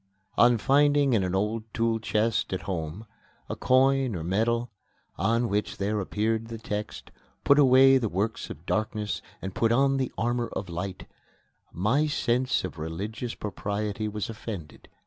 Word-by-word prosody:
On 120 0 +5
finding 145 +2 +3
in 105 -4 +3
an 90 0 -1
old 105 +3 -1
tool 115 -1 +1
chest 110 -1 0
at 95 - -3
home 85 +2 -4 0.4
a - - -4
coin 130 -2 +3
or 80 - -4
medal, 115 +7 0 0.4
on 115 +6 +1
which 105 -1 -2
there 105 +2 -1
appeared 110 +3 -1
the 115 0 -6
text, 105 -1 -5 0.3
"Put 140 +1 +5
away 135 0 +7
the 115 -4 -1
works 100 +5 -2
of 80 - -9
darkness 105 0 -2 0.2
and 95 0 -4
put 115 +3 +1
on 135 +3 +3
the 130 -2 -1
armour 120 0 0
of 100 - -4
light," 90 +3 -5 0.7
my 120 - +1
sense 125 -3 +1
of 95 -3 -6
religious 100 +9 -4
propriety 105 +1 -3
was 105 -1 -3
offended. 105 -8 -8
110 Hz, 155 wpm, -27 LUFS, 100-120 Hz, 0.7 s, away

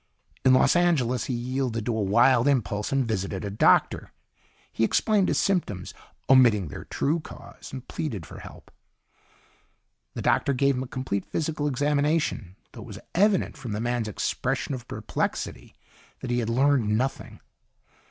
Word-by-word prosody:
In 130 0 +6
Los - - +4
Angeles 145 -9 +2
he 130 - -3
yielded 120 -2 -2
to 120 - -1
a 110 - -1
wild 120 +6 +4
impulse 105 -6 0
and 135 -3 +1
visited 95 -2 -3
a 100 - -4
doctor. 100 - +2 0.6
He - - 0
explained 205 - +2
his - - +1
symptoms, 165 - -1 0.3
omitting 115 - +5
their - - -8
true 155 +4 -1
cause, 155 - -12
and 130 -1 -8
pleaded 110 - -4
for - - -11
help. - - -13 1.4
The - - -4
doctor 140 - +2
gave 140 +2 +2
him 125 - -2
a 130 - -5
complete 125 -7 -3
physical 155 -2 -2
examination, 145 - 0 0.2
though - - -10
it - - -10
was - - -9
evident 195 -3 +2
from 125 -6 -6
the 105 - -3
man's 120 -1 -1
expression 105 +6 -2
of 125 -2 -7
perplexity - - -4 0.5
that 125 - -4
he 120 - +1
had 115 -1 -2
learned 125 -4 +2
nothing. 130 +3 -3
130 Hz, 160 wpm, -26 LUFS, 110-145 Hz, 1.4 s, In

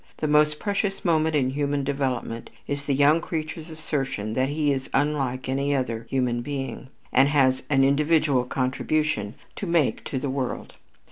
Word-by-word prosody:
The 155 - -1
most 150 0 +4
precious 200 0 -2
moment 160 -2 +2
in 130 -3 +2
human 145 0 -1
development 130 -4 -2 0.2
is 145 0 -3
the 140 - +1
young 145 +4 +4
creature's 160 0 -5
assertion 135 -9 -3
that 130 +3 +1
he 145 0 +1
is 130 -1 -4
unlike 135 -3 0
any 140 +2 0
other 115 -3 -2
human 125 -3 0
being, 135 -1 -5 0.3
and 135 +2 +5
has 130 -3 +3
an 135 -2 +4
individual 145 -2 +3
contribution 130 -3 -1 0.2
to 200 - -4
make 170 -5 +1
to 135 - -3
the 140 - -2
world. 130 -2 -3
140 Hz, 160 wpm, -25 LUFS, 130-150 Hz, 0.3 s, and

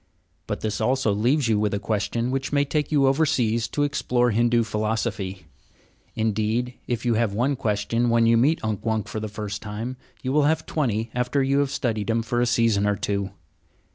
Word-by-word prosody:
But - - -3
this 110 -1 -2
also 130 -4 +2
leaves 120 +6 +2
you 110 -2 +2
with 105 -1 0
a - - -2
question 115 +3 -1
which 135 0 -2
may 145 0 +2
take 150 +1 -1
you 145 -3 +4
overseas 135 -6 +2
to 145 - -1
explore 125 -4 +1
Hindu 120 +2 +3
philosophy. 110 -3 -2 0.7
Indeed, 110 +3 0
if 120 -1 -2
you 120 - +3
have 110 -2 +1
one 130 +6 +1
question 115 +1 0
when 115 0 +4
you 115 0 +5
meet 140 +8 +2
Unk 110 -2 -2
Wunk 110 -2 -1
for 110 - -4
the 110 - -4
first 105 -1 -5
time, 115 +4 -5 0.3
you 130 - -1
will 150 -1 +4
have 160 0 0
twenty 115 -7 -1
after 125 +3 0
you 135 +1 +2
have 140 -1 +1
studied 115 -6 -2
him 115 0 +1
for 120 +2 -1
a 120 - +2
season 115 -4 +2
or 105 - +2
two. 100 -1 -2
115 Hz, 200 wpm, -24 LUFS, 110-130 Hz, 0.7 s, you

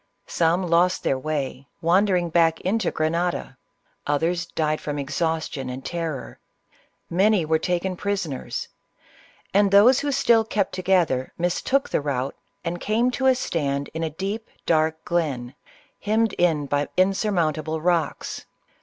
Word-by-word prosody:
Some 170 +2 +1
lost 175 +2 +2
their 135 - +1
way, 140 -2 -3
wander 185 +4 +3
ing 175 -1 0
back 165 -1 +3
into 210 +1 0
Grenada; 165 -2 -1 0.5
others 170 +4 0
died 155 -2 -1
from 145 -1 -4
exhaustion 145 -1 -2
and 130 +1 -7
terror; 165 -6 -4 0.7
many 195 0 +3
were 160 0 +2
taken 180 +2 -1
prisoners, 185 -8 -3 0.9
and 200 +1 +4
those 210 +6 +6
who 285 0 -1
still 235 -5 +4
kept 205 -3 -1
together 175 -8 +1
mistook 180 +10 0
the - - 0
route 135 -2 -2 0.3
and 170 +1 -3
came 230 +4 +1
to 265 +1 0
a 260 - +5
stand 140 - -2
in 160 - -4
a 160 - -1
deep, 195 +7 -5 0.2
dark 160 -1 +1
glen, 140 -8 -1 0.5
hemmed 220 +1 +1
in 160 -5 +1
by 145 +1 0
insurmount 185 -5 +2
able 160 +1 -3
rocks. 170 -2 -1
170 Hz, 140 wpm, -24 LUFS, 155-195 Hz, 0.9 s, those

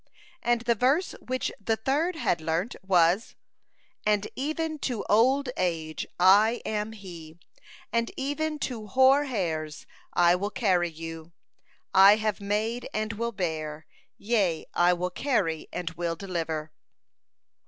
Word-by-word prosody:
And 240 -3 +1
the 235 0 +2
verse 265 - +1
which 255 +1 -2
the 225 +2 +1
third 290 +10 0
had 175 - 0
learnt 165 +7 -1
was: 185 +2 +2 0.7
"And 210 -1 +1
even 310 +2 -2
to 245 -6 -2
old 255 +6 +3
age 160 -3 -2
I 205 +6 +5
am 215 0 -2
He, 170 -6 -11 0.6
and 230 0 +1
even 300 +3 -2
to 225 -5 -4
hoar 265 +6 +5
hairs 160 - -3 0.3
I 175 0 +4
will 200 +3 -2
carry 185 -5 +1
you: 165 0 -9 0.6
I 195 +2 +8
have 215 -1 -2
made 215 +4 -2
and 215 +1 -1
will 235 +2 -2
bear; 160 -6 -4 0.3
yea, 200 -7 0
I 175 0 +4
will 180 +1 -2
carry 185 - -1
and 175 -2 -4
will 170 0 -3
deliver." 165 -4 -4
205 Hz, 130 wpm, -27 LUFS, 170-240 Hz, 0.7 s, I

